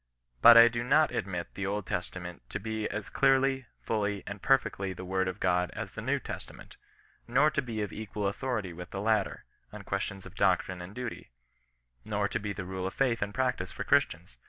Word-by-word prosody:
But 120 - +10
I 115 0 +10
do 120 0 -1
not 150 +5 +4
admit 95 -8 -3
the 95 0 -3
Old 100 -1 -2
Testament 90 -1 -5
to 100 - -3
be 110 0 -3
as 105 0 -4
clearly, 135 -1 +2 0.2
fully, 105 -2 -1
and 100 -1 -7
perfectly 100 -8 +1
the 90 +1 -8
word 95 0 0
of 95 +2 -4
God 90 -1 +2
as - - -5
the - - -7
New - - +1
Testament; - - -8 0.5
nor 135 +6 +4
to 140 - 0
be 115 -5 -3
of 105 - -5
equal 105 -1 -4
authority 105 -3 -2
with 90 +1 -8
the 100 - -5
latter, 105 -1 0 0.3
on - - -9
questiors 95 -1 -3
of - - -11
doctrine 95 -1 +1
and 90 +4 -9
duty; 125 -2 -6 0.7
nor 105 -1 0
to 115 - -1
be 105 -1 -3
the 100 -2 -5
rule 95 0 -3
of 95 - -6
faith 125 -5 +1
and 100 0 -1
practice 125 +3 -1
for - - -5
Christians. - - +1
105 Hz, 205 wpm, -30 LUFS, 95-120 Hz, 0.7 s, But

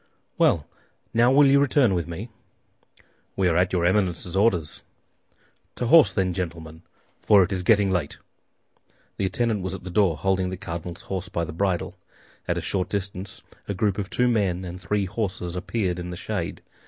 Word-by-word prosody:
"Well; 75 - +2 0.5
now 120 +2 +4
will 145 +2 +6
you 140 +1 +5
return 140 -6 +3
with 85 -3 -1
me?" 95 +8 -6 1.1
"We 95 -1 +2
are 85 - +2
at 90 +1 +2
your 90 -2 +1
Eminence's 90 -2 0
orders." 95 -7 +1 0.9
"To 125 - -2
horse, 160 +5 +6
then, 95 -2 0
gentlemen; 80 -3 -6 0.4
for 100 -3 +5
it 90 - -3
is 95 -2 -1
getting 100 0 +3
late." 90 -6 -2 1.0
The 100 - 0
attendant 110 +2 0
was 95 +1 -3
at - - -10
the 95 - -7
door, 90 -5 +2
holding 95 -1 0
the 95 - -5
cardinal's 85 -2 -6
horse 95 0 -5
by 85 -3 -2
the 85 - -7
bridle. 90 0 -2 0.5
At - - 0
a - - -2
short 90 -2 -2
distance 100 -1 -5 0.2
a 100 - -3
group 100 +1 0
of 100 -1 -4
two 125 +3 +1
men 95 -6 0
and 90 +1 -8
three 100 +2 0
horses 90 -3 -3
appeared 90 -1 -2
in 90 0 -5
the 90 - -6
shade. - - -4
95 Hz, 180 wpm, -24 LUFS, 90-105 Hz, 1.1 s, will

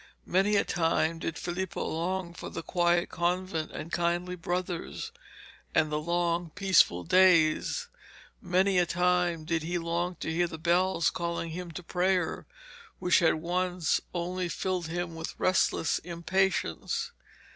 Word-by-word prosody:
Many 195 +3 +2
a 200 - +4
time 165 -1 +1
did 165 - -3
Filippo 180 +1 -3
long 170 +2 -2
for - - -7
the 165 - -6
quiet 175 0 +2
convent, 175 -1 -1
the 155 - -6
kindly 175 +2 -1
brothers, 180 - -3 0.6
and 155 -1 +3
the 150 - 0
long 170 +1 0
peaceful 185 - +4
days. 185 - +4 0.5
Many 185 -1 +2
a 175 - +2
time 180 -2 +1
did 165 0 0
he 175 +3 -2
long 170 +1 -2
to 160 - -4
hear 175 +1 +2
the 165 - -7
bells 175 +2 +2
calling 170 -1 -3
him 180 +1 -6
to 180 - -7
prayer, 180 +1 0 0.5
which 180 - +3
had 170 -3 +4
once 175 +1 0
only 180 +1 -2
filled 185 -1 -2
him 175 +1 -3
with 160 0 -6
restless 185 -3 +2
impatience. 190 - -1
175 Hz, 140 wpm, -29 LUFS, 165-185 Hz, 0.6 s, a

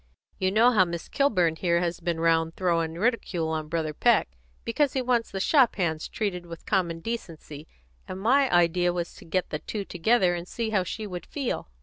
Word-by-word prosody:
You 185 - +2
know 230 +5 +5
how 210 -6 +5
Miss 170 -2 -5
Kilburn 180 - +1
here 170 -1 +1
has 175 -1 -2
been 170 -1 -2
round 165 0 +2
throwing 165 -3 0
ridicule 185 -5 -1
on 155 -1 -3
Brother 155 -1 -2
Peck, 235 +8 +3 0.4
because 280 +4 +1
he 265 - 0
wants 240 -2 +1
the 195 - -5
shop 260 +4 +4
hands 160 -5 -1
treated 180 -5 -3
with 165 -1 -10
common 170 -4 0
decency, 160 -8 -7 0.4
and 185 - -6
my 260 +6 +3
idea 175 0 +3
was 175 -1 -3
to - - -14
get 185 +2 -2
the 150 - -2
two 205 +3 -5
together 185 +1 +2
and 175 0 -5
see 225 +1 -3
how 200 -3 +2
she 215 +4 -5
would 180 -3 -7
feel." 275 - -3
180 Hz, 200 wpm, -26 LUFS, 165-220 Hz, 0.4 s, know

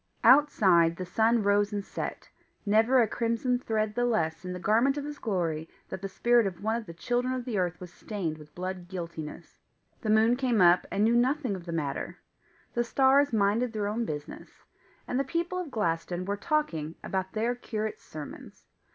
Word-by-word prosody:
Outside, 200 - +5
the 185 - -5
sun 225 +5 +2
rose 205 +1 +2
and 205 -1 -3
set, - - -6 0.3
never 225 +5 +4
a - - 0
crimson 235 +3 0
thread 215 -3 -1
the 245 - 0
less 180 -9 0
in 180 - -5
the 180 - -5
garment 230 +9 +2
of 290 - -3
his 295 0 -7
glory 165 -7 -2 0.2
that 190 - -6
the 195 - -4
spirit 240 +2 +3
of 185 0 -7
one 220 +1 +1
of 235 -1 -4
the 170 - -8
children 245 +7 -1
of 250 -2 -4
the 225 -6 -1
earth 175 -2 -1
was 180 -1 -10
stained 170 -8 -4
with 150 0 -15
blood 185 0 -5
guiltiness; 170 -4 -7 0.4
the 220 - -3
moon 220 +2 +5
came 245 -4 +1
up 175 0 +5
and 200 - 0
knew 230 +2 +4
nothing 255 -2 +1
of 180 -2 -9
the - - -4
matter; 150 -4 -3 0.6
the 240 - +1
stars 275 +3 +4
minded 220 +3 +1
their 210 -2 -2
own 220 +3 -1
business; 150 -8 -7 0.4
and 250 - -1
the - - +2
people 335 +6 -2
of 355 -4 -4
Glaston 175 -5 -2
were 200 +1 -1
talking 200 - -1
about 190 -1 -3
their 230 +3 0
curate's 220 -3 -4
sermons. 155 -2 -10
215 Hz, 195 wpm, -28 LUFS, 180-245 Hz, 0.6 s, Outside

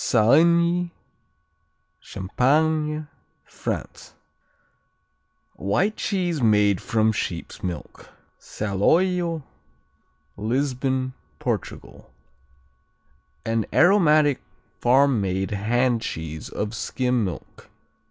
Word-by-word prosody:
Saligny 170 +9 +4 1.1
Champagne, 150 +9 0 0.4
France - - -6 1.4
White 180 - 0
cheese 175 -6 -1
made 105 -4 +3
from 110 -1 +1
sheep's 90 -5 -4
milk. 90 -4 -7 0.3
Saloio 165 - 0 0.9
Lisbon, 130 +3 -1 0.2
Portugal - - -5 1.4
An 115 -1 0
aromatic 155 -6 +4 0.4
farm 130 -1 +4
made 95 +1 -2
hand 120 +4 +1
cheese 80 -6 -6
of 105 +1 -4
skim 125 +1 -1
milk. 90 -7 -7
125 Hz, 70 wpm, -24 LUFS, 105-155 Hz, 1.4 s, Saligny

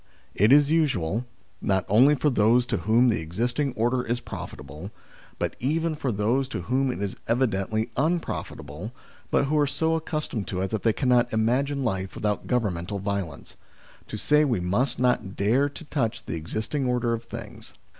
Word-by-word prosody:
It 105 +5 +4
is 145 +1 +6
usual, 125 - +1 0.3
not 95 -2 +1
only 130 +9 +6
for 150 +1 +1
those 120 +2 +4
to - - -1
whom 120 +3 +3
the 110 - +1
existing 120 - -1
order 120 +2 +1
is 120 0 -2
profitable, 75 - -8 0.5
but - - -2
even 160 +5 0
for 145 -4 -2
those 115 +6 +1
to 90 - -5
whom 130 +7 +1
it - - -6
is 100 - -4
evidently 110 -2 0
unprofitable, 125 - -3 0.4
but - - +2
who 150 +2 +1
are 145 - +3
so 160 +3 0
accustomed 155 -9 -2
to 90 -1 -2
it 95 - -2
that 110 -2 -1
they 115 - +3
cannot 125 0 +2
imagine 130 +6 +1
life 95 -5 -2
without 105 -1 -2
governmental 100 -6 -1
violence, 100 -6 -4 0.5
to - - -5
say 150 +1 +3
we 125 -9 +1
must 100 +10 +1
not 125 -6 +1
dare 125 +8 +2
to 155 - -11
touch 130 -7 -2
the - - -4
existing 110 - -2
order 120 -1 +1
of 115 0 -4
things. - - -9
120 Hz, 175 wpm, -26 LUFS, 100-135 Hz, 0.5 s, is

